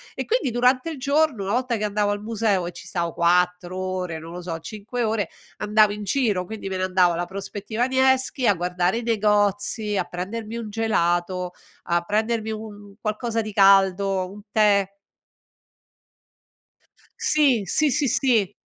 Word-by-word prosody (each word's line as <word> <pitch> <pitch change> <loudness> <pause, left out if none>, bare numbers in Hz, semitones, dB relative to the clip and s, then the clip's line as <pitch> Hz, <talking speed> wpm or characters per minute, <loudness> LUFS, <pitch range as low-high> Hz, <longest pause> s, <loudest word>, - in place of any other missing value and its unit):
e - - -2
quindi 460 - 0
durante 250 +5 +2
il 315 - -6
giorno 280 -4 +1
una 195 - -2
volta 250 0 0
che 215 - -3
andavo 205 0 0
al 205 0 -3
museo 215 -5 0
e - - -5
ci - - -12
stavo 170 -2 -2
4 180 +1 +1
ore, 185 -3 -3
non 165 +1 -9
lo 180 - -7
so, 170 -2 -4
5 215 +7 -5
ore, 215 -4 0 0.3
andavo 210 0 +3
in 210 0 -5
giro, 205 -5 0
quindi 215 -1 -6
me 190 - -3
ne 185 - -1
andavo 185 -1 +3
alla 175 +1 -2
prospettiva 205 +5 -3
Nevskij 260 0 +2
a 205 - +4
guardare 180 +4 0
i 240 - -6
negozi, 210 -1 +1
a 185 - 0
prendermi 210 +6 -5
un 230 -2 -5
gelato, 180 -4 0 0.4
a 170 0 +2
prendermi 220 +3 -1
un 215 0 -5
un 205 -1 -14
qualcosa 225 +2 -2
di 215 -1 -6
caldo, 195 -1 +4
un 205 - -11
tè. 200 -2 +3 2.3
Sì, 275 -8 +3
sì, 305 +11 +2
sì, 290 0 +1
sì, 220 -7 +2
205 Hz, 165 wpm, -23 LUFS, 185-230 Hz, 2.3 s, a